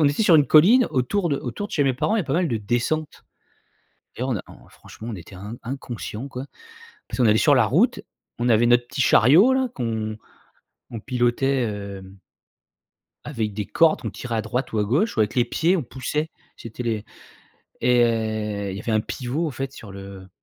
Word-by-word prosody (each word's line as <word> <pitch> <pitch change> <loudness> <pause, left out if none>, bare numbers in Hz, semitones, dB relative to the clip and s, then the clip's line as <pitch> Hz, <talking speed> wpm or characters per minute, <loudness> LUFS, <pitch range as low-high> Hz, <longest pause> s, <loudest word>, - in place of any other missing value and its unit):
on 150 - +5
était 145 +9 0
sur 185 -5 +5
une 145 -2 +4
colline 220 +11 +6
autour 170 +9 0
de 140 - 0
autour 130 - -5
de - - -17
chez 145 - +2
mes 135 -2 +2
parents, 210 - 0
il 220 - +2
y - - -1
a - - -10
pas 135 - -3
mal 175 0 +1
de 115 - -1
descentes 120 +9 -1 1.1
et 125 - -4
on 130 -4 -1
a - - -5
en - - -16
franchement 115 - -12
on - - -5
était 90 +3 -12
in 105 +5 -8
inconscient, 125 -1 -6
quoi. 135 0 -7 0.6
Parce - - -6
qu'on 125 - +4
allait 110 - +4
sur - - +4
la - - +4
route, - - +2 0.4
on 120 +1 +1
avait 115 +1 +4
notre 120 0 +3
petit 135 - -3
chariot 155 - +6
là 260 -1 +1
qu'on 110 -2 -3 0.7
on 115 - -6
pilotait, 125 +2 0 0.3
hem 95 +1 -13 1.1
avec 110 -8 -3
des 105 0 -3
cordes, 165 +9 +3
on - - -2
tirait 120 -2 -6
à 110 - 0
droite 125 +2 -3
ou - - +1
à 105 - +2
gauche 145 - 0
ou - - +2
avec 105 - +1
les 120 -2 +3
pieds, 170 +4 +1
on - - -2
poussait. 140 +5 -3 0.3
C'était 115 +1 -8
les 110 -3 -2 0.8
et 110 -4 +1
il 95 - -5
y 100 - -6
avait 115 - -3
un 110 - +3
pivot, 130 +9 -3
en - - -2
fait, 135 +1 -5
sur 105 -6 -11
le 95 -1 -10
120 Hz, 215 wpm, -23 LUFS, 110-145 Hz, 1.1 s, colline